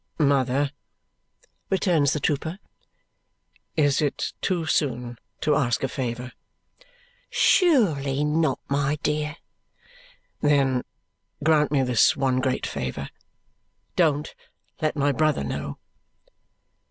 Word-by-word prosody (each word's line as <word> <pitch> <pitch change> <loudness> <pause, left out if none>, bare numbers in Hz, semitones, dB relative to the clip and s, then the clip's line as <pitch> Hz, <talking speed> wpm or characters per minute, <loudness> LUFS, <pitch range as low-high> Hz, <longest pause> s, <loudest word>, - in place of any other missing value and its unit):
"Mother," 140 -1 +2 1.0
returns 170 -7 +2
the 150 - -1
trooper, 160 +4 -1 1.2
"is 145 -2 +3
it 145 -2 -1
too 175 -4 0
soon 125 -6 -1 0.2
to 150 - +2
ask 130 -5 +1
a - - +2
favour?" 125 -1 -4 1.0
"Surely 160 - +3
not, 150 -1 +1
my 140 +1 0
dear." 150 0 -1 1.1
"Then 135 -4 +2 0.6
grant 155 -1 +3
me 140 -3 +3
this 125 -3 +3
one 130 -2 +1
great 130 0 -1
favour. 65 +2 -4 0.9
Don't 150 -4 +1 0.5
let 155 0 0
my 145 -1 +2
brother 155 - +1
know." 70 - -4
145 Hz, 100 wpm, -25 LUFS, 130-155 Hz, 1.2 s, is